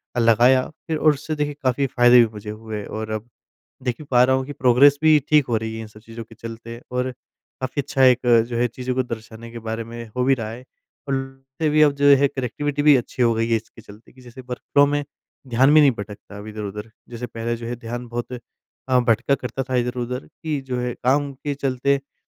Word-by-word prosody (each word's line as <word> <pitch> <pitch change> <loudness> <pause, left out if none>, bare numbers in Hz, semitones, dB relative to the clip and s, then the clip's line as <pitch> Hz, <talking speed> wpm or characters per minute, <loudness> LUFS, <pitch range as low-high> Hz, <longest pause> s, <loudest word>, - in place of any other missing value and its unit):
अ, - - +1
लगाया 120 +3 +4 0.2
फिर 160 -2 -1
और 155 0 +4
उससे 155 +2 -5
देखिए 145 -1 -2
काफ़ी 130 +2 +1
फ़ायदे 120 -1 +5
भी 120 - +6
मुझे 105 0 -8
हुए 110 -1 -6
और 110 0 -5
अब 110 +2 -5 0.5
देख 125 -2 -2
ही - - -8
पा 125 -1 +5
रहा 130 +1 +3
हूँ 130 - -2
कि 145 - -6
प्रोग्रेस 135 +2 +5
भी 155 -1 +6
ठीक 150 -3 +4
हो 115 - +1
रही 110 0 -3
है 110 - -5
इन - - -8
सब 105 0 -16
चीज़ों 115 +1 -9
के 115 - -16
चलते 115 +1 -9
और 125 +1 -1 0.5
काफ़ी 130 +2 -2
अच्छा 135 -1 +1
एक 125 -1 +4 0.2
जो 120 - -4
है 120 - +3
चीज़ों 125 +2 -4
को 130 - +1
दर्शाने 115 -1 -8
के 120 - -8
बारे 115 +1 -3
में 115 +1 -8
हो 125 - +1
भी 135 +1 +4
रहा 115 -4 -5
है 120 +3 -9 0.4
उल 135 - +1 0.5
भी 155 0 +3
अब 150 -1 +5
जो 145 - +3
है 140 +1 +3
कनेक्टिविटी 140 +3 -3
भी 145 -1 +7
अच्छी 125 0 -2
हो 115 -1 +4
गई 115 +1 0
है 115 - +4
इसके 115 0 -9
चलते 105 +2 -16
कि 130 - -18
जैसे 125 +1 -12
वर्क 125 - -4
फ्लो 145 0 +6
में 145 0 -1 0.4
ध्यान 130 +4 +4
भी 155 - +8
नहीं 145 -2 +6
भटकता 100 0 -9
अब 105 - -9
इधर-उधर। 105 0 -6 0.2
जैसे 120 0 -6
पहले 115 0 -4
जो 115 0 -8
है 120 +1 -4
ध्यान 120 +1 -6
बहुत 120 +1 -5
अ, 125 +1 -4
भटका 120 +3 +2
करता 125 0 -4
था 130 - +1
इधर-उधर 125 +1 -2
कि 155 -2 -5
जो 125 -1 -1
है 125 -1 -2
काम 140 +2 +2
के 140 +2 -4
चलते 140 0 0
अ, 140 0 -16
125 Hz, 235 wpm, -22 LUFS, 115-135 Hz, 0.5 s, भी